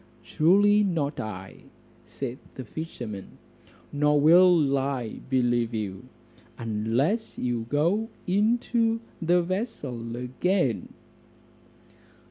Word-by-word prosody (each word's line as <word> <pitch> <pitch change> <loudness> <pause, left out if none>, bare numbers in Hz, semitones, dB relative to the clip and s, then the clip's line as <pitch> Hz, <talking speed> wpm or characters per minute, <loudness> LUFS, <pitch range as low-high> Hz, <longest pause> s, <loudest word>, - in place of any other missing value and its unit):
"Truly 200 - +4
not 160 -7 -1
I," 95 -3 -7 0.4
said 130 -2 -6 0.2
the 130 - -7
fisherman; 120 - -7 0.6
"nor 150 0 +3
will 165 -2 +6
I 135 -4 -2
believe 120 -3 +1
you, 100 -3 -4 0.5
unless 115 - -1
you 120 -2 -2
go 175 - +1 0.2
into 225 +3 +1 0.2
the 175 +1 +3
vessel 150 - -4
again." 125 - -1
145 Hz, 90 wpm, -26 LUFS, 120-185 Hz, 0.6 s, will